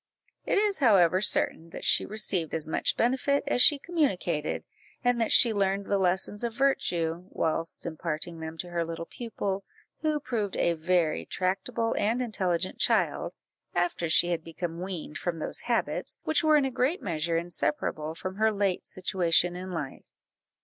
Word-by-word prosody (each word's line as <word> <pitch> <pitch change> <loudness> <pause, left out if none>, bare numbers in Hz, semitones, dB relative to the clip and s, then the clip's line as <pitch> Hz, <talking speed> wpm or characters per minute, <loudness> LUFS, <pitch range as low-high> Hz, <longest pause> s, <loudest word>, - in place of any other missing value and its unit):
It - - +2
is 410 -1 +1
however 190 - +5
certain, 165 -4 +1
that - - -8
she - - +4
received 195 -7 0
as 160 -1 -2
much 160 - 0
benefit 265 +4 +1
as 280 -3 +1
she 295 +3 +7
communicated, 265 - -1 0.4
and 245 -1 +2
that 225 - 0
she 235 -2 +7
learned 195 -1 0
the 200 0 +1
lessons 190 +3 0
of 235 -2 -2
virtue 175 -11 0
whilst 165 +1 -2
imparting 165 0 -4
them 160 0 -6
to 175 +1 -6
her 170 -1 0
little 165 0 -5
pupil, 200 -3 -4 0.4
who 310 -1 +1
proved 220 -8 -3
a 170 - +2
very 165 0 +1
tractable 195 +5 -1
and 225 +4 +1
intelligent 185 -7 -1
child, - - +1 0.4
after 175 -1 0
she 175 +2 +4
had 165 -2 -1
become 165 +1 -5
weaned 180 -5 -5
from 175 -2 -2
those 155 - -3
habits - - -1
which 315 +1 +1
were 310 -1 +5
in 285 - +2
a 265 - -1
great 265 +9 0
measure 165 -2 -1
inseparable 170 - -1
from 185 +3 -6
her 220 +1 +3
late 200 -3 -1
situation 180 -2 +1
in 185 +1 -6
life. 150 -6 -5
185 Hz, 165 wpm, -28 LUFS, 165-230 Hz, 0.4 s, she